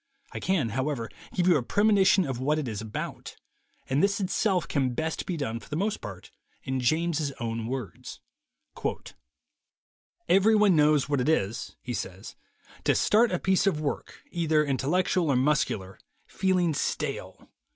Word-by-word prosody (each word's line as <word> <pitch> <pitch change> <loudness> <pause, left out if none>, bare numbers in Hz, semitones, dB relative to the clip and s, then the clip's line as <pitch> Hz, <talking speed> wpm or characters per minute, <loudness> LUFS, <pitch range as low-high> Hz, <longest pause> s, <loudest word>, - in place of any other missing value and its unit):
I - - -5
can, 175 -11 0
however, 130 -1 -2 0.2
give 180 - 0
you 175 -4 +6
a - - 0
premonition 200 - +3
of 135 -4 -3
what 150 +4 +1
it 150 -4 -2
is 110 -3 -4
about, 110 -1 -6 0.5
and 135 +3 +1
this 200 +1 +2
itself 190 -2 0
can 130 -4 0
best 160 +2 -2
be 180 - -2
done, 115 -6 -3
for - - -16
the 150 - -3
most 200 +6 -1
part, 95 -4 -9 0.3
in 130 0 -2
James's 155 +2 +1
own 115 -3 -4
words: 125 -2 -6 2.1
"Everyone 205 0 +5
knows 150 -2 +4
what 145 -3 +1
it 130 - +1
is," 115 -6 -1
he 125 - -4
says, 95 -2 -6 0.5
"to - - +3
start 225 +2 +4
a 180 - +1
piece 190 +2 +2
of 160 -6 +1
work, 150 -2 -4
either 160 -3 +2
intellectual 155 +5 +1
or 140 - +3
muscular, 125 -8 0 0.3
feeling 185 -4 +1
stale. - - -4
150 Hz, 155 wpm, -27 LUFS, 125-180 Hz, 2.1 s, you